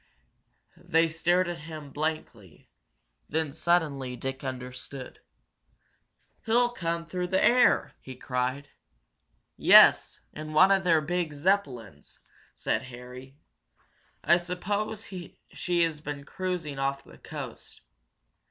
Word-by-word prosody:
They 165 +1 +2
stared 175 +3 +1
at 175 -1 -4
him 155 -3 -8
blankly. 145 - -5 0.6
Then, 155 -1 -1
suddenly, 150 -5 0
Dick 135 +2 -5
understood. 130 0 -7 1.2
"He'll 240 +2 +3
come 170 -5 -3
through 180 +2 -3
the 190 +1 +1
air!" 245 +3 +4
he 130 - -10
cried. 130 +2 -3 0.9
"Yes, - - +6
in 155 +1 -7
one 185 +5 +6
of 195 -1 +3
their 165 -3 +4
big 170 0 -2
Zeppelins!" 140 - -2 0.4
said - - -1
Harry. 125 +2 -11 0.9
"I 170 - +5
suppose 200 +5 -3
she 175 -1 -3
has 160 -2 -2
been 145 -2 -6
cruising 170 -4 -4
off 140 0 -1
the - - -17
coast. - - -9
155 Hz, 110 wpm, -28 LUFS, 135-180 Hz, 1.2 s, Yes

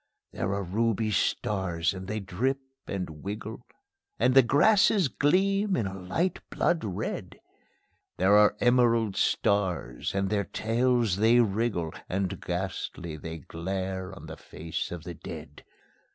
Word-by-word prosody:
There 95 - -2
are 100 - -2
ruby 110 +3 0
stars 95 -7 0
and 95 -1 -7
they 110 +2 -2
drip 110 +8 -1 0.3
and 90 -6 -5
wiggle; 105 +3 -6 0.5
And 130 - +3
the 135 - +9
grasses 190 - +4
gleam 195 - +2
in 115 - 0
a 95 - -4
light 95 - -1
blood 170 - +1
red; 100 -5 -4 0.8
There 95 +3 +4
are 105 0 +5
emerald 115 -4 +3
stars, 90 -11 0
and 95 0 0
their 100 -2 +1
tails 115 0 +1
they 115 +3 +5
wriggle, 105 -7 0 0.2
And 95 0 -2
ghastly 85 -2 -4
they 80 +2 -6
glare 95 +4 -4
on - - -11
the - - -8
face 80 +1 -5
of 85 -2 -6
the 85 - -6
dead. 75 -2 -9
100 Hz, 140 wpm, -28 LUFS, 90-120 Hz, 0.8 s, the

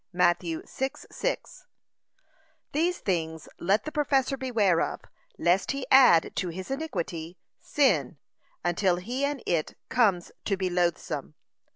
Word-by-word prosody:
(Matt. 175 -1 +3
6:6) 265 - -4 1.1
These 340 +4 +1
things 160 -4 -2
let 195 +5 +2
the 310 - -4
professor 275 -3 +1
beware 220 -10 +2
of, - - -2 0.4
lest 180 - +2
he 275 -1 -4
add 250 -11 +6
to 180 - -1
his 185 +8 -7
iniquity, 180 - -4 0.2
sin, 170 - +1 0.5
until 175 +1 +2
he 240 +10 -4
and 285 -2 -1
it 165 -3 -1
comes 200 -8 +2
to 195 - 0
be 185 -1 -1
loathsome. 175 - -1
190 Hz, 120 wpm, -27 LUFS, 170-265 Hz, 1.1 s, add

